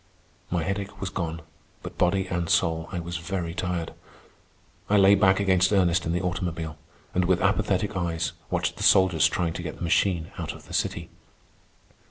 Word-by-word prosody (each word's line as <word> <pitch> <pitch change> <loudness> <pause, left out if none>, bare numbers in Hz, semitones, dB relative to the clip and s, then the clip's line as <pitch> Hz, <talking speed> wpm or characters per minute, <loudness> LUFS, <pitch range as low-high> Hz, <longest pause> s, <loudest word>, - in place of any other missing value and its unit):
My 85 -2 0
headache 100 +2 -4
was 95 -2 -4
gone, 80 -4 -4 0.4
but, - - -9
body 95 +2 +2
and 85 -2 -2
soul, 80 0 +1
I 90 - -4
was 85 +1 -4
very 85 0 -4
tired. 90 -2 -3 1.0
I 105 - +4
lay 100 0 +7
back 95 -1 +4
against 95 -1 +3
Ernest 90 -4 +2
in - - 0
the 90 +2 -1
automobile, 85 -3 -3 0.3
and 90 0 +2
with 90 0 +2
apathetic 100 0 +1
eyes 85 -3 -1 0.2
watched - - -1
the - - -8
soldiers 95 -5 +5
trying 85 -2 -1
to 90 - -5
get 85 - -5
the - - -8
machine 85 -1 +1
out - - -4
of - - -14
the - - -12
city. - - -2
90 Hz, 180 wpm, -26 LUFS, 85-95 Hz, 1.0 s, lay